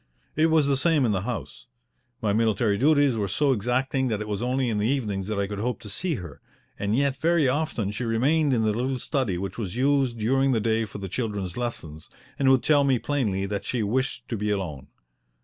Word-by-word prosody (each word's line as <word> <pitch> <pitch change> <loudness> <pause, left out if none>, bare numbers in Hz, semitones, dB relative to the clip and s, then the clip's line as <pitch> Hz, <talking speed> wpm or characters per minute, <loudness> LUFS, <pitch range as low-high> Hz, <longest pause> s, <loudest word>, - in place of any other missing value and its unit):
It 155 +2 +4
was 160 -2 +3
the 140 0 +2
same 150 0 +2
in 115 - +2
the 95 -2 0
house. 125 - -6 0.6
My 105 -2 +2
military 110 -1 +2
duties 145 +1 +3
were 105 -3 -1
so 135 +9 +2
exacting 130 +4 0
that 110 -4 -1
it 105 - -5
was 105 -1 -3
only 125 +1 0
in 110 -3 0
the 105 - +1
evenings 105 -8 -1
that 105 -1 -2
I 100 - +1
could 100 0 -5
hope 120 +1 -2
to 105 - -8
see 175 - -1
her, 85 - -9 0.4
and 105 +1 0
yet 140 -1 +1
very 165 -2 +3
often 130 -7 -1
she 110 +4 -4
remained 140 +7 +2
in 115 -3 +2
the 110 -1 +2
little 130 +4 -1
study 125 - -1
which 95 +4 -5
was 100 -3 -4
used 135 -2 +2
during 135 +5 +2
the 115 - +2
day 110 +1 +1
for 105 - -9
the 100 -1 -5
children's 100 -4 -3
lessons, 80 -11 -5 0.3
and 135 -1 +4
would 130 -2 +4
tell 145 -2 +4
me 135 -2 +3
plainly 110 -9 -1
that 100 0 -3
she 120 -4 -1
wished 130 +6 -1
to 115 - -2
be 105 +1 -2
alone. 90 -10 -3
115 Hz, 225 wpm, -25 LUFS, 105-135 Hz, 0.6 s, It